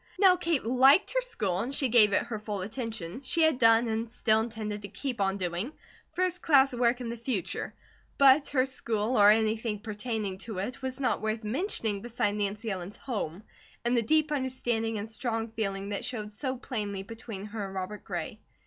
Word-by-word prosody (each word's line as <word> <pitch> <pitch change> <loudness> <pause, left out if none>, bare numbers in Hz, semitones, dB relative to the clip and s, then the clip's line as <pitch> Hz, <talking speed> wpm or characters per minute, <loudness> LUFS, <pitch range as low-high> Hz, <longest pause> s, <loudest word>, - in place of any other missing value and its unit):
Now 375 -1 +6
Kate 335 -7 -1
liked 265 - +5
her - - +2
school 210 - -1
and 255 +7 -2
she 270 - +2
gave 220 -4 +6
it - - +2
her 220 -3 -5
full 210 -2 -4
attention; 220 -1 -5
she 330 +4 +1
had 315 -5 +3
done, 230 0 +5
and 225 +1 -2
still 220 -2 +2
intended 215 -2 -4
to 200 - -6
keep 240 +2 -4
on 195 0 +1
doing, 180 - -3 0.4
first 365 0 -1
class 275 -4 +5
work 245 0 +2
in 240 - -4
the 235 - -4
future; 230 -5 -3 0.4
but 275 +1 +6
her 260 -2 +2
school, 235 -3 -2
or 205 -2 +7
anything 220 0 +2
pertaining 210 -2 -4
to 220 -2 -6
it, 205 +8 -4
was 260 0 -4
not 265 - 0
worth 220 +1 -2
mentioning 220 - -1
beside 235 -3 0
Nancy 210 +2 -2
Ellen's 185 +1 -6
HOME, 205 - -4 0.4
and 240 +1 +2
the 235 - +3
deep 310 +6 +2
understanding 240 -5 -1
and 205 +1 -4
strong 225 0 -2
feeling 200 -3 -3
that 205 - -2
showed 215 -4 -4
so 260 +4 -3
plainly 210 -7 -4
between 220 -1 -8
her 210 0 -5
and 195 - -9
Robert 190 +3 -5
Gray. 180 +3 -5
225 Hz, 195 wpm, -29 LUFS, 205-255 Hz, 0.4 s, or